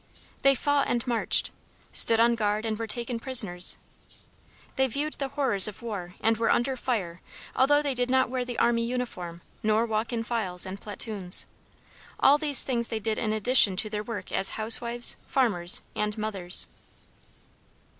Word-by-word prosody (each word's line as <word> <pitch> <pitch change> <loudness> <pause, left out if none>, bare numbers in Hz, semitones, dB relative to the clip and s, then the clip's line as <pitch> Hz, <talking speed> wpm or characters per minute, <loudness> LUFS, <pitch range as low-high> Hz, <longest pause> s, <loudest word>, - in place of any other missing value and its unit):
They 275 0 +4
fought 285 +2 0
and 240 0 -2
marched, 240 -3 +1 0.4
stood 225 -1 +5
on 235 +1 +3
guard 215 -1 -2
and 220 -1 -2
were 225 - -4
taken 235 +1 -4
prisoners. 210 -9 +4 1.0
They 265 -1 +1
viewed 290 +5 -4
the 275 - -2
horrors 260 -9 +6
of 210 +2 -10
war 190 -6 -7
and 225 +1 +1
were 230 - -1
under 260 +2 0
fire 195 -9 -4 0.3
although 290 +3 +2
they 285 -2 -1
did 245 0 -2
not 260 0 +2
wear 250 0 -3
the 245 -1 -7
army 235 0 +1
uniform 210 -9 -6 0.2
nor 215 +1 +1
walk 220 +1 -3
in 230 -1 -3
files 215 -7 -3
and 190 +1 -8
platoons. 205 -3 -2 0.7
All 290 +2 +4
these 290 -4 +3
things 235 -3 -2
they 225 - -4
did 220 +1 -3
in 215 - -2
addition 215 -2 +3
to 210 +3 -3
their 210 -1 -3
work 230 0 -8
as 195 - 0
housewives, 235 +2 +1
farmers, 190 -10 +2
and 210 +1 -3
mothers. 200 -5 -1
230 Hz, 165 wpm, -26 LUFS, 210-250 Hz, 1.0 s, horrors